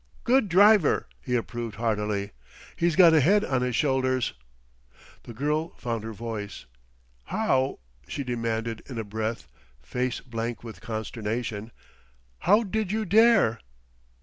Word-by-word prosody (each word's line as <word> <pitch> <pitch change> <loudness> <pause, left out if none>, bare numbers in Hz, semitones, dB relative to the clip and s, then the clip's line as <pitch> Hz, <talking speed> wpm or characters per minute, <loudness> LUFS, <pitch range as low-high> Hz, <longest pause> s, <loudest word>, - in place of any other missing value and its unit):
"Good 250 -3 +3
driver!" 200 -1 +5 0.2
he 125 -2 -2
approved 115 -2 -3
heartily. 105 -3 -1 0.4
"He's 170 -1 +1
got 170 -2 +7
a 160 - +6
head 200 +9 +4
on 130 -2 0
his 125 -1 -1
shoulders!" 130 - +1 0.9
The 120 - -8
girl 150 +6 -1
found 115 -3 -3
her 110 - -5
voice. 110 -2 -6 0.6
"How," 135 -11 0 0.3
she 140 - -4
demanded 115 -2 -2
in 130 - -7
a 115 - -2
breath, 110 - -4 0.3
face 120 - -3
blank 115 -1 -5
with 115 -2 -9
consternation, 110 0 -4 0.7
"how 210 +4 +4
did 215 -1 -2
you 220 0 -1
dare?" 210 - +4
125 Hz, 130 wpm, -26 LUFS, 115-165 Hz, 0.9 s, got